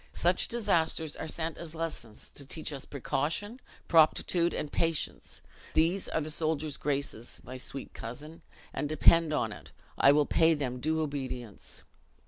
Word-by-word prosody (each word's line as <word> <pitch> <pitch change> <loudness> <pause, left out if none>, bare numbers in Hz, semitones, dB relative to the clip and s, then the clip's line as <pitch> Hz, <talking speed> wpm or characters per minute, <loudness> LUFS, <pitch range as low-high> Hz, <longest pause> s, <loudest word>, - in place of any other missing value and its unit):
Such 175 +1 +3
disasters 165 -9 +1
are 160 - -5
sent 160 +1 -2
as 165 -1 -7
lessons 155 -10 -5
to 140 - -10
teach 155 +2 -4
us 135 - -5
precaution, 160 - -2 0.3
proptitude 170 +1 +4
and 150 - -3
patience 165 -2 -1 0.3
these 170 +5 +2
are 160 - 0
the 155 +1 -4
soldier's 155 -2 0
graces, 140 -5 -2
my 130 - -7
sweet 135 +1 -5
cousin, 150 +8 -8 0.3
and 145 - -2
depend 160 +1 +5
on 115 -7 0
it, - - -11 0.3
I 140 - +8
will 145 0 +4
pay 165 +1 +4
them 130 -4 -3
due 160 +4 0
obedience." 130 -7 -5
155 Hz, 150 wpm, -30 LUFS, 140-165 Hz, 0.3 s, I